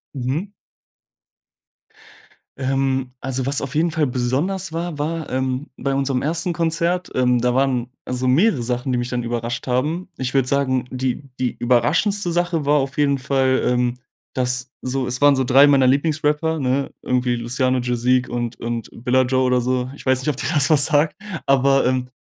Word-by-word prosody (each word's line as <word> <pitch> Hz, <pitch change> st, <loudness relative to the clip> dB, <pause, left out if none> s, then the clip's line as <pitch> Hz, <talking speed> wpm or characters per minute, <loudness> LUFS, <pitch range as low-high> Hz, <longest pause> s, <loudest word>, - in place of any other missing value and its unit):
Mhm. 135 Hz, +9 st, -2 dB, 2.1 s
Ähm, 135 Hz, -1 st, -1 dB
also 130 Hz, 0 st, -2 dB
was 140 Hz, +1 st, 0 dB
auf 135 Hz, 0 st, -5 dB
jeden 165 Hz, +2 st, +2 dB
Fall 155 Hz, -2 st, +1 dB
besonders 140 Hz, +10 st, -1 dB
war, 170 Hz, -1 st, -3 dB
war, 155 Hz, +1 st, -3 dB
ähm, 130 Hz, +2 st, -2 dB
bei 135 Hz, +1 st, -2 dB
unserem 135 Hz, -1 st, 0 dB
1. 170 Hz, +3 st, -1 dB
Konzert, 170 Hz, +2 st, 0 dB
ähm, 125 Hz, -1 st, +2 dB
da 125 Hz, +1 st, +1 dB
waren 130 Hz, -2 st, +1 dB
also 125 Hz, 0 st, -2 dB
mehrere 140 Hz, -, +3 dB
Sachen, 125 Hz, +2 st, -2 dB
die 125 Hz, -, +1 dB
mich 120 Hz, 0 st, -2 dB
dann 125 Hz, -1 st, -2 dB
überrascht 120 Hz, +1 st, -3 dB
haben. 150 Hz, +9 st, -1 dB
Ich 130 Hz, -1 st, -3 dB
würde 135 Hz, -2 st, +2 dB
sagen, 130 Hz, -2 st, +1 dB
die 130 Hz, 0 st, -2 dB, 0.2 s
die 125 Hz, -1 st, -1 dB
überraschendste 165 Hz, -, +1 dB
Sache 175 Hz, -3 st, 0 dB
war 145 Hz, +1 st, +3 dB
auf 135 Hz, +1 st, -2 dB
jeden 140 Hz, -2 st, +2 dB
Fall, 130 Hz, 0 st, +1 dB
ähm, 125 Hz, 0 st, +1 dB, 0.4 s
dass 125 Hz, 0 st, -2 dB
so 130 Hz, +1 st, -2 dB
es 125 Hz, +1 st, -1 dB
waren 145 Hz, -1 st, +6 dB
so 130 Hz, -, +1 dB
3 135 Hz, +3 st, +6 dB
meiner 140 Hz, -2 st, +4 dB
Lieblingsrapper, 150 Hz, +3 st, +1 dB
ne, 135 Hz, 0 st, 0 dB
irgendwie 125 Hz, -1 st, 0 dB
Luciano, 125 Hz, +2 st, 0 dB
Jazeek 125 Hz, +1 st, +1 dB
und 120 Hz, -1 st, -3 dB
und 115 Hz, -1 st, -4 dB
Billa 125 Hz, +2 st, +1 dB
Joe 130 Hz, +1 st, +1 dB
oder 125 Hz, -1 st, +2 dB
so. 125 Hz, +1 st, -1 dB
Ich -, -, -13 dB
weiß 130 Hz, -1 st, +3 dB
nicht, 130 Hz, -, -2 dB
ob 145 Hz, -, -2 dB
dir -, -, -2 dB
das 145 Hz, -4 st, +3 dB
was 145 Hz, -3 st, +5 dB
sagt, 150 Hz, 0 st, +2 dB, 0.3 s
aber, 135 Hz, 0 st, +3 dB
ähm, 125 Hz, 0 st, 0 dB
130 Hz, 180 wpm, -21 LUFS, 125-145 Hz, 2.1 s, waren